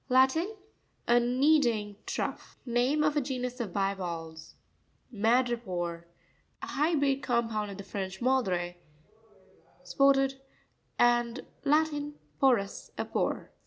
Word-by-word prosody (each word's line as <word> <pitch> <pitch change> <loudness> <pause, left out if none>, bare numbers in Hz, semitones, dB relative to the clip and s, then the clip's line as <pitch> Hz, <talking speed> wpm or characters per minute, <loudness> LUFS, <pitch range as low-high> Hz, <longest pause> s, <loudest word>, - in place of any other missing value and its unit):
— - - -39
Latin. 265 +11 +3 0.5
A_ 240 0 +5
kneading. 245 -5 +2
trough. - - -4
Name 250 +5 +2
of 300 0 +2
a 295 - +3
genus 250 -2 -4
of 225 -6 -3
bi 195 +1 0
valves. 165 -4 -7 0.6
Ma'prepore.—A 200 -7 -2
hybrid 285 -3 +1
compound 225 -4 0
of 195 - -8
the 200 - -7
French 190 -1 -5
madré, 185 -9 0 1.1
spotted, 270 +8 +3 0.6
and. 240 0 +2 0.2
Latin, 295 0 +1 0.2
porus,a 235 -8 +1
pore. - - -2
240 Hz, 105 wpm, -29 LUFS, 200-270 Hz, 1.1 s, A